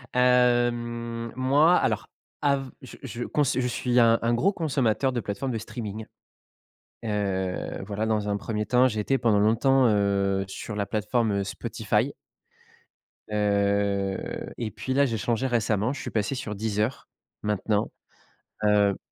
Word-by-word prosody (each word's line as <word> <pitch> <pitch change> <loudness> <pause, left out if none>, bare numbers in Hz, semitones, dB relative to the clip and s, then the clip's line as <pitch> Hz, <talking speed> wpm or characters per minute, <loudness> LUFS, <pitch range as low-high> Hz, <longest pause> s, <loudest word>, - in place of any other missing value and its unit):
hem, 120 -2 +2
moi 145 +7 +4
alors, - - 0 0.3
av 140 -2 +1
je 130 - -11
je 120 -1 -5
cons 150 - +1
je 125 -1 0
suis 125 0 +1
un 115 -1 +5
un 115 +1 +1
gros 190 +11 +2
consommateur 135 - +1
de 125 - -2
plateforme 105 +7 -3
de 115 - -2
streaming. 110 -1 -6 1.0
Heu, 95 -4 -2
voilà 105 +1 -2
dans 110 -2 0
un 100 - 0
1er 105 +1 -3
temps 125 +1 +4
j'ai 110 -4 -2
été 135 +6 +1
pendant 110 -5 +2
longtemps, 125 +5 +4
heu, 100 -2 +1
sur 105 +2 -6
la 100 -1 -1
plateforme, 110 +2 0
heu, - - -1
Spotify - - -1 1.2
heu, 100 -1 0
et 115 -3 -3
puis, 130 - -4
là, 140 +1 +4
j'ai 115 -4 -1
changé 120 +4 0
récemment, 110 -1 +1
je 140 - -7
suis - - -6
passé 110 +5 -1
sur 115 -5 -5
Deezer. 110 +4 -2 0.3
Maintenant, 105 0 0 0.7
heu 105 -2 +3
115 Hz, 150 wpm, -26 LUFS, 105-125 Hz, 1.2 s, un